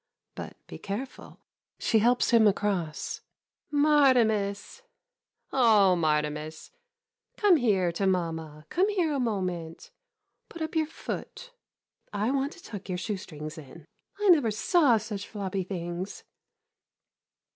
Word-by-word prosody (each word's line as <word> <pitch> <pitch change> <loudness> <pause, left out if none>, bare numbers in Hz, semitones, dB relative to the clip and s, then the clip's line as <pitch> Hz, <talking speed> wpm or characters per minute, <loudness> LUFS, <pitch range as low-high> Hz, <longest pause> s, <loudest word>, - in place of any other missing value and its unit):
But - - -8
be - - -10
careful. 215 +7 -7 0.4
[She 225 - +2
helps 245 +4 +3
him 230 -2 +6
across.] 190 -6 -1 0.5
Martimas 255 - +3 0.3
— - - -39
oh, 215 -7 +5
Martimas 150 -1 -1 0.3
— 470 0 -54
come 400 -5 +5
here 195 - +2
to 195 +3 -1
mamma 160 -4 -2
— - - -48
come 380 +4 +2
here 355 -7 +1
a 280 - -1
moment. 180 -8 -3 0.6
Put 335 - -6
up 315 +1 -5
your 315 -1 +2
foot 485 +8 -7 0.3
— - - -44
I - - +2
want 275 +2 -1
to 340 - -16
tuck 200 -3 -8
your 180 - -1
shoe 205 +2 -3
strings 155 -3 -8
in. 150 +2 -13 0.3
I 415 -1 +2
never 295 -10 +5
saw 250 - +3
such 210 -2 -5
floppy 195 -2 -3
things. 175 0 -5
205 Hz, 135 wpm, -28 LUFS, 175-275 Hz, 0.6 s, him